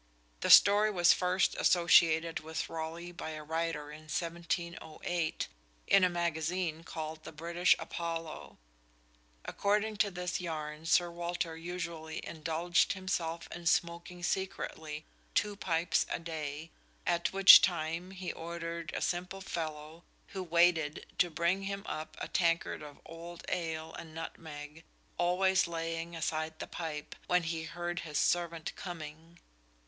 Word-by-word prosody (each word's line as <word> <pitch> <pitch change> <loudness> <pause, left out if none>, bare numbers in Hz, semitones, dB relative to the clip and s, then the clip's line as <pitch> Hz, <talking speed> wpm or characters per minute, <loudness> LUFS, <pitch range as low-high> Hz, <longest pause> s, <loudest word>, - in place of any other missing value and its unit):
The - - -1
story 205 +1 +8
was 175 -4 +5
first 180 +1 +2
associated 165 -2 +5
with 160 +1 -4
Raleigh 165 +2 -5
by 165 -2 -6
a 155 - -7
writer 160 -1 -2
in 155 +1 -11
1708 170 0 -2 0.4
in 195 - +5
a 180 - +5
magazine 170 -1 -1
called 155 -1 -6
the - - -8
British 170 +3 +3
Apollo. 165 -2 -5 0.9
According 210 +1 0
to 205 - +3
this 180 -1 -3
yarn 155 -2 -5
Sir 175 +1 +4
Walter 170 -1 -3
usually 165 -2 -5
"indulged 165 +2 +1
himself 170 -3 -2
in 175 -1 -5
Smoaking 170 +1 0
secretly, 160 -5 -3 0.3
two 205 0 +2
pipes 170 -3 +1
a - - -1
Day; 160 -2 -5 0.3
at 170 -1 +1
which 195 0 +10
time, 170 0 0
he 190 -1 -5
order'd 170 -1 -5
a - - -2
Simple 180 +2 -2
Fellow, 160 -2 -5 0.3
who 195 - -5
waited, 170 -3 +2
to 175 - +4
bring 170 +4 +1
him 200 0 -3
up 155 - -5
a - - -3
Tankard 170 -3 +1
of 145 -1 -10
old 170 +1 -9
Ale 160 -2 -3
and 160 -1 -9
Nutmeg, 155 -1 -8 0.4
always 190 +2 +3
laying 165 0 -3
aside 155 0 -2
the - - -5
Pipe, 155 -3 -5
when 180 -1 +3
he 165 -1 -3
heard 175 +1 -4
his 150 -5 -4
servant 170 0 0
coming." 165 -1 -8
170 Hz, 135 wpm, -32 LUFS, 160-175 Hz, 0.9 s, which